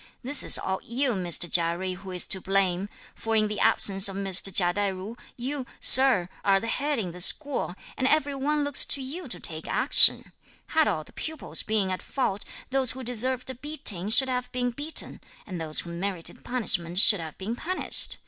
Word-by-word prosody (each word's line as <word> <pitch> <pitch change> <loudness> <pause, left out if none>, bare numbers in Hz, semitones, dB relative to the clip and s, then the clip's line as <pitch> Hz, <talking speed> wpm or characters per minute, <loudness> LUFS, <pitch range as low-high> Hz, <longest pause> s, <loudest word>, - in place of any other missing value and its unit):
This 280 +3 +1
is - - +6
all 190 0 -4
you, 255 +3 -2
Mr. 180 -6 -1
Chia 170 -1 +1
Jui, 185 0 -5
who 195 0 -12
is 180 -1 0
to 190 - -2
blame; 195 0 -1 0.2
for 225 0 -4
in 215 -1 +2
the 210 -1 -5
absence 195 0 +2
of 195 - -8
Mr. 195 0 +2
Chia 175 -1 +3
Tai 205 0 -1
ju, 190 +5 -9 0.2
you, 260 +1 -5
sir, 255 -9 +6 0.2
are 195 -1 +2
the 230 - -7
head 285 +5 -2
in 190 -6 -4
this 180 +1 +5
school, 285 - -1 0.2
and 260 - -1
every 290 -1 +1
one 290 +2 -2
looks 285 -1 +6
to - - +1
you 285 +6 -7
to 180 -8 -3
take 160 -1 -3
action. - - +4 0.4
Had 315 -1 +1
all 155 - -2
the - - -18
pupils 315 -2 -4
been 210 -3 -1
at 185 - -5
fault, 205 -7 -3 0.3
those 260 -3 +2
who 260 0 -9
deserved 250 +2 -2
a - - -8
beating 235 - -1
should 265 +4 +3
have 250 -1 -4
been 245 -1 -2
beaten, 290 +6 0 0.2
and 180 -4 -7
those 155 -1 -1
who 170 - -10
merited 175 0 -6
punishment 180 -8 -3
should 205 0 +5
have 160 -2 -9
been 210 +5 -5
punished! 365 +9 0
215 Hz, 205 wpm, -25 LUFS, 185-260 Hz, 0.4 s, is